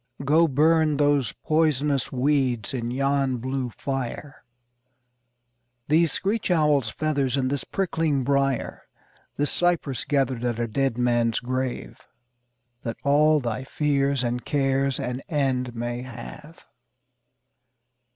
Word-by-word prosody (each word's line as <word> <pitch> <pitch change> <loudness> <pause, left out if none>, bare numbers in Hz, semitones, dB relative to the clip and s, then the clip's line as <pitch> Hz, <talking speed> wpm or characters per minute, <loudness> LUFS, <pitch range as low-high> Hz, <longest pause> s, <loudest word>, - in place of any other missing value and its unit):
Go 160 +4 +4
burn 155 +1 +3
those 145 -4 +2
poisonous 150 -4 0
weeds 130 -4 0
in 120 -2 -3
yon 135 0 0
blue 130 +1 -3
fire, 135 +2 -5 1.5
These 160 +1 +4
screech 205 +3 -1
owl's 150 -8 +2
feathers 140 0 -1
and 130 -1 0
this 140 - -1
prickling 165 -7 -1
briar, 135 -1 0 0.6
This 145 0 +2
cypress 170 -7 0
gathered 135 -4 0
at 120 -2 -1
a 120 0 -1
dead 135 +1 -1
man's 120 -2 +1
grave, 130 0 -4 0.8
That 115 - -5
all 150 +2 +4
thy 120 -1 -3
fears 140 -1 0
and 120 0 -2
cares 135 -1 0
an 125 +1 -3
end 130 -5 -1
may 120 +1 -3
have. 130 +6 -10
135 Hz, 115 wpm, -25 LUFS, 125-150 Hz, 1.5 s, Go